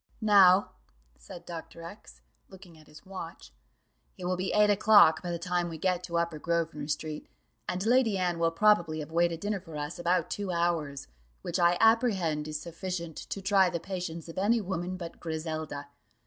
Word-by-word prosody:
"Now," 200 Hz, -3 st, +5 dB, 0.5 s
said 175 Hz, -2 st, -11 dB
Dr. 165 Hz, 0 st, -9 dB
X, -, -, -12 dB, 0.3 s
looking 185 Hz, -3 st, -14 dB
at 155 Hz, -1 st, -18 dB
his 150 Hz, 0 st, -16 dB
watch, 170 Hz, -, -9 dB, 0.6 s
"it 180 Hz, -, -7 dB
will 185 Hz, +1 st, 0 dB
be 185 Hz, +1 st, -2 dB
eight 210 Hz, 0 st, +4 dB
o'clock 205 Hz, -5 st, +6 dB
by 180 Hz, -, -5 dB
the 170 Hz, -, -2 dB
time 175 Hz, 0 st, -1 dB
we 165 Hz, -, -7 dB
get 180 Hz, +2 st, 0 dB
to 170 Hz, -1 st, -3 dB
Upper 170 Hz, -2 st, -1 dB
Grosvenor 165 Hz, -3 st, -2 dB
street, 155 Hz, 0 st, -4 dB, 0.4 s
and 185 Hz, +2 st, -2 dB
Lady 235 Hz, -3 st, +3 dB
Anne 175 Hz, -2 st, -1 dB
will 165 Hz, 0 st, +3 dB
probably 170 Hz, -3 st, +3 dB
have 150 Hz, -, -9 dB
waited 170 Hz, 0 st, +1 dB
dinner 205 Hz, -1 st, -2 dB
for 165 Hz, -4 st, -10 dB
us 150 Hz, +3 st, -5 dB
about 175 Hz, -1 st, 0 dB
two 200 Hz, -2 st, -3 dB
hours, 170 Hz, -5 st, -1 dB, 0.4 s
which -, -, -2 dB
I 175 Hz, 0 st, +4 dB
apprehend 195 Hz, -10 st, +2 dB
is 155 Hz, 0 st, -4 dB
sufficient 170 Hz, 0 st, -6 dB
to 195 Hz, -, -6 dB
try 195 Hz, -1 st, +4 dB
the 170 Hz, -, -3 dB
patience 175 Hz, -3 st, -6 dB
of 165 Hz, +2 st, -6 dB
any 225 Hz, +4 st, +3 dB
woman 185 Hz, -2 st, -4 dB
but 170 Hz, -2 st, -8 dB
Griselda. 155 Hz, -3 st, -5 dB
175 Hz, 180 wpm, -29 LUFS, 160-190 Hz, 0.6 s, o'clock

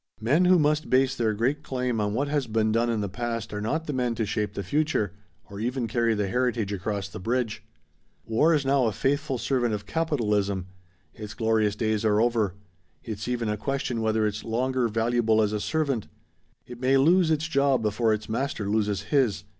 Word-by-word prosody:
Men 140 Hz, +11 st, +3 dB
who 180 Hz, 0 st, +6 dB
must 150 Hz, -1 st, +1 dB
base 130 Hz, +1 st, +3 dB
their 110 Hz, -4 st, 0 dB
great 130 Hz, +7 st, 0 dB
claim 125 Hz, -5 st, -2 dB
on 105 Hz, 0 st, -1 dB
what 140 Hz, +4 st, 0 dB
has 145 Hz, -3 st, -1 dB
been 110 Hz, 0 st, +1 dB
done 115 Hz, +2 st, +1 dB
in 115 Hz, -2 st, 0 dB
the 100 Hz, -, -1 dB
past 115 Hz, +2 st, -4 dB
are 105 Hz, -, -3 dB
not 155 Hz, +10 st, -1 dB
the 150 Hz, -, -3 dB
men 125 Hz, -2 st, 0 dB
to 110 Hz, -1 st, -1 dB
shape 105 Hz, 0 st, -2 dB
the 100 Hz, -, -3 dB
future 145 Hz, -, 0 dB, 0.3 s
or 100 Hz, -, -9 dB
even 120 Hz, +2 st, -2 dB
carry 115 Hz, 0 st, +1 dB
the 105 Hz, -1 st, -1 dB
heritage 120 Hz, -2 st, 0 dB
across 100 Hz, 0 st, -3 dB
the 95 Hz, -, -9 dB
bridge. 115 Hz, +2 st, -1 dB, 0.6 s
War 115 Hz, +9 st, +3 dB
is 145 Hz, -2 st, 0 dB
now 135 Hz, -2 st, +3 dB
a 110 Hz, -, -1 dB
faithful 140 Hz, +3 st, 0 dB
servant 120 Hz, -3 st, 0 dB
of 105 Hz, 0 st, -7 dB
capitalism. 105 Hz, -, 0 dB, 0.5 s
Its 105 Hz, -1 st, -8 dB
glorious 110 Hz, -2 st, +1 dB
days 110 Hz, -1 st, 0 dB
are 105 Hz, -1 st, +3 dB
over. 110 Hz, -5 st, +1 dB, 0.5 s
It's 105 Hz, -1 st, -5 dB
even 120 Hz, -2 st, -1 dB
a 105 Hz, 0 st, -1 dB
question 130 Hz, -1 st, -2 dB
whether 110 Hz, 0 st, +1 dB
it's 105 Hz, 0 st, -2 dB
longer 125 Hz, +2 st, 0 dB
valuable 115 Hz, 0 st, +1 dB
as 105 Hz, -1 st, +2 dB
a 105 Hz, -, -1 dB
servant. 140 Hz, -2 st, -1 dB, 0.6 s
It 120 Hz, -1 st, -10 dB
may 130 Hz, +2 st, +3 dB
lose 170 Hz, +5 st, +4 dB
its 160 Hz, 0 st, +1 dB
job 140 Hz, -5 st, +2 dB
before 110 Hz, +2 st, +1 dB
its 110 Hz, 0 st, -2 dB
master 115 Hz, -3 st, -2 dB
loses 105 Hz, -2 st, 0 dB
his. 105 Hz, -4 st, +1 dB
115 Hz, 200 wpm, -26 LUFS, 105-135 Hz, 0.6 s, who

